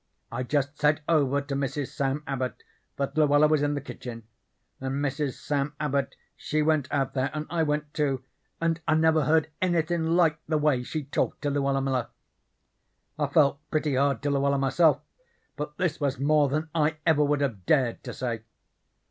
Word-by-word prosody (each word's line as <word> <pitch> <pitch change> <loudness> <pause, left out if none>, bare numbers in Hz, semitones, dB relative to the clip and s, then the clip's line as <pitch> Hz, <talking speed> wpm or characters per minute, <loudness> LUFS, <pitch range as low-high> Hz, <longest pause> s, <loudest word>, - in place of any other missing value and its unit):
I - - -3
just 145 +2 -1
said 150 +1 +3
over 140 -4 +2
to 140 0 -6
Mrs. 135 0 -2
Sam 140 +2 -2
Abbot 130 -2 -3 0.3
that 140 -1 -3
Luella 150 -1 +5
was 155 -1 +2
in 145 0 +1
the 145 - -3
kitchen, 120 -4 -8 0.6
and 130 0 -3
Mrs. 140 -1 -1
Sam 145 0 -2
Abbot 140 -2 -1 0.2
she 155 0 -1
went 155 -3 +1
out 135 -2 0
there, 135 0 0
and 150 0 -3
I 170 -1 +1
went, 150 -1 -1
too, 135 -4 0 0.4
and 165 0 0
I 155 - +4
never 160 -2 +3
heard 160 0 +2
anythin' 170 -2 +1
like 160 -4 +3
the 155 0 +1
way 150 -4 +2
she 150 +5 -4
talked 140 +2 -2
to 145 - 0
Luella 140 -1 +1
Miller. 130 -3 -1 1.1
I 145 - +1
felt 140 -1 +3
pretty 155 -2 0
hard 135 -2 +1
to 145 - +1
Luella 140 0 +2
myself, 140 +4 +3 0.5
but 150 0 -6
this 180 -4 -1
was 140 -3 0
more 145 0 +3
than 155 +3 -2
I 155 -1 +1
ever 155 -2 +4
would 145 0 +1
have 110 -10 -2
dared 130 -6 +2
to - - -4
say. 120 -3 -3
145 Hz, 180 wpm, -27 LUFS, 135-155 Hz, 1.1 s, Luella